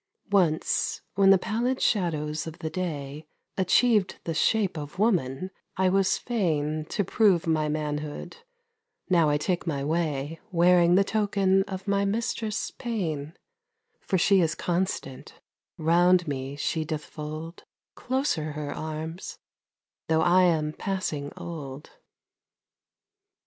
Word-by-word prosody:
Once, 175 -6 +1
when 195 0 +4
the 195 - +8
pallid 240 +7 -1
shadows 155 -6 0
of 160 +1 -7
the 160 -3 -5
day 150 -4 -4 0.3
Achieved 200 +1 +3
the 165 - -2
shape 200 +3 +2
of 150 +2 -7
woman, 185 - 0 0.3
I 190 0 +3
was 195 +1 +2
fain 155 -9 -1
To 200 - -1
prove 195 -3 +3
my 155 -2 +1
manhood, 150 - -4 0.7
now 170 -4 +4
I 145 - +2
take 175 +4 -2
my 140 -4 -1
way 155 -1 -1
Wearing 175 0 +5
the 195 - +5
token 200 -2 +2
of 190 0 -7
my 200 0 +2
mistress 215 +1 -2
Pain, 165 - -4 0.6
For 190 - -1
she 190 +2 +4
is 165 -1 +1
constant, 175 -7 -3 0.4
round 175 +2 +4
me 135 -1 -4
she 155 +2 -1
doth 155 -1 -4
fold 155 +2 -7 0.3
Closer 250 - -1
her 150 -1 -4
arms, 160 +3 -6 0.7
though 160 0 +3
I 180 +2 +5
am 155 -3 +1
passing 155 -8 -3
old. 150 -4 -7
170 Hz, 125 wpm, -27 LUFS, 150-195 Hz, 0.7 s, the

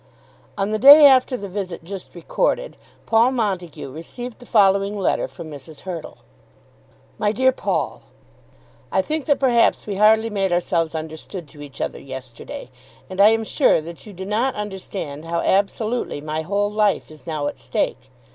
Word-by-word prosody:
On 200 +1 -1
the 215 - 0
day 290 +4 +10
after 260 -2 +5
the 200 - -6
visit 185 -3 -5
just 190 +2 -9
recorded, - - -1 0.3
Paul 230 +2 +4
Montague 185 - -3
received 225 - -8
the 245 - -14
following 200 -1 +3
letter 195 - 0
from 165 -2 -10
Mrs. 145 +1 -11
Hurtle: 175 -4 -7 1.0
MY 210 - +2
DEAR 260 +4 +3
PAUL, - - -2 0.9
I - - +2
think 310 -1 -2
that 285 - +3
perhaps 245 -4 +3
we 200 -2 -4
hardly 220 +2 +4
made 195 -2 0
ourselves 170 -2 0
understood 160 +2 -6
to 145 - -13
each 145 -2 -10
other - - -3
yesterday, 130 -2 -9 0.4
and 185 +1 0
I 205 - +8
am 225 0 +1
sure 260 - +3
that 165 +5 -10
you 210 - -10
do 190 +1 -7
not 225 +6 0
understand 190 -7 -6
how 170 0 -1
absolutely 215 0 0
my 155 +1 -3
whole 200 +5 -1
life 210 -5 +1
is 155 +2 -15
now 155 -3 -2
at - - -4
stake. - - -2
195 Hz, 165 wpm, -21 LUFS, 165-225 Hz, 1.0 s, day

